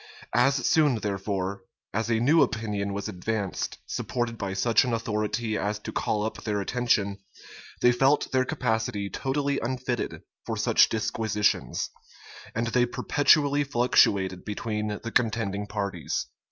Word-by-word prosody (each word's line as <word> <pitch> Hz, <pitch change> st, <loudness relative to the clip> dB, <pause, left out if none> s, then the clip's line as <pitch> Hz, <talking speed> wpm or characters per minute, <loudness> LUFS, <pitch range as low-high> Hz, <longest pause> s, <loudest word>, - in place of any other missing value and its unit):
As 130 Hz, +3 st, +4 dB
soon, 150 Hz, -5 st, +4 dB
therefore, 100 Hz, -2 st, -2 dB, 0.3 s
as 110 Hz, +2 st, -1 dB
a 115 Hz, -1 st, +2 dB
new 150 Hz, +8 st, +4 dB
opinion 105 Hz, -6 st, -1 dB
was 100 Hz, +1 st, -3 dB
advanced, 105 Hz, 0 st, -3 dB
supported 120 Hz, -2 st, -2 dB
by 100 Hz, -3 st, -4 dB
such 115 Hz, +4 st, +4 dB
an 125 Hz, -2 st, -1 dB
authority 110 Hz, 0 st, -1 dB
as 105 Hz, 0 st, -1 dB
to 105 Hz, -, -7 dB
call 105 Hz, -1 st, -1 dB
up 110 Hz, -, -4 dB
their 105 Hz, -2 st, -1 dB
attention, 100 Hz, -2 st, 0 dB, 0.6 s
they 125 Hz, -, +7 dB
felt 135 Hz, +4 st, +2 dB
their 130 Hz, -1 st, +3 dB
capacity 110 Hz, -5 st, -1 dB
totally 140 Hz, +1 st, -1 dB
unfitted 125 Hz, 0 st, -3 dB, 0.2 s
for -, -, -3 dB
such -, -, +4 dB
disquisitions; 105 Hz, -, 0 dB, 0.6 s
and 115 Hz, +1 st, 0 dB
they 120 Hz, +1 st, +2 dB
perpetually 145 Hz, +3 st, +3 dB
fluctuated 100 Hz, -8 st, +2 dB
between 105 Hz, 0 st, -3 dB, 0.2 s
the 115 Hz, -, -4 dB
contending 105 Hz, -4 st, 0 dB
parties. 100 Hz, -6 st, -3 dB
110 Hz, 135 wpm, -27 LUFS, 100-125 Hz, 0.6 s, they